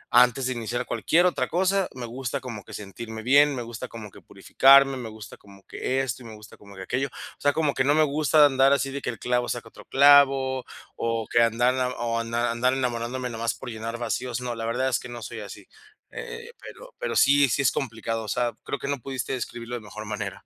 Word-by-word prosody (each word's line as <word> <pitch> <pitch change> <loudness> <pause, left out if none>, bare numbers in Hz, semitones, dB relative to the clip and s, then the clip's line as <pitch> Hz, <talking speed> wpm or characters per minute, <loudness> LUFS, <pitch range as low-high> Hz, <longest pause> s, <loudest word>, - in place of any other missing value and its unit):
antes 125 +1 +5
de 130 - 0
iniciar 120 0 -3
cualquier 175 +2 +2
otra 180 - +1
cosa, 190 +2 +1
me 125 - -5
gusta 125 +3 -4
como 120 -6 -8
que 110 - -13
sentirme 110 +2 -8
bien, 140 +3 +5
me 125 - -4
gusta 120 +2 -7
como 105 -3 -10
que - - -15
purificarme, 135 0 +5
me 120 -3 -6
gusta 110 -1 -11
como 100 -1 -18
que 130 +6 -2
esto 130 -1 -4
y - - -12
me 110 - -10
gusta 105 0 -14
como 100 -1 -15
que 95 - -8
aquello. 135 +6 -1
O - - -12
sea, 145 - +3
como 150 -3 +1
que 130 - +1
no 145 +2 +3
me 155 - +5
gusta 150 0 +4
andar 135 0 +4
así 135 -1 0
de 140 +1 -5
que - - -3
el 115 - -5
clavo 125 0 0
saca 120 -2 -4
otro - - -15
clavo 135 -2 +5 0.3
o 115 -1 -1
que 120 - +4
andar 115 +2 +3
na 130 -1 0
o 115 -1 -1
andar 115 +1 -1
andar 125 +2 +1
enamorándome 125 0 -2
nada 115 0 -6
más 115 - 0
por 130 - -8
llenar 115 +1 -5
vacíos. 120 +1 -3
No, 125 -1 -3
la 115 0 -4
verdad 125 +3 0
es 120 - 0
que 125 - -10
no 120 -2 -8
soy 110 +1 -7
así, 100 -2 -9 0.5
eh 465 - -7
eh, - - -11
pero - - -12
pero - - -3
sí 140 -1 +5
sí 140 - +1
es 130 - +4
complicado, 115 -3 -3
o - - -9
sea, 120 +1 0
creo - - -3
que - - -5
no 140 -2 -1
pudiste 135 0 -4
describirlo 120 -1 -5
de 120 - -6
mejor 105 +1 -9
manera. 105 -2 -5
125 Hz, 245 wpm, -25 LUFS, 115-135 Hz, 0.5 s, antes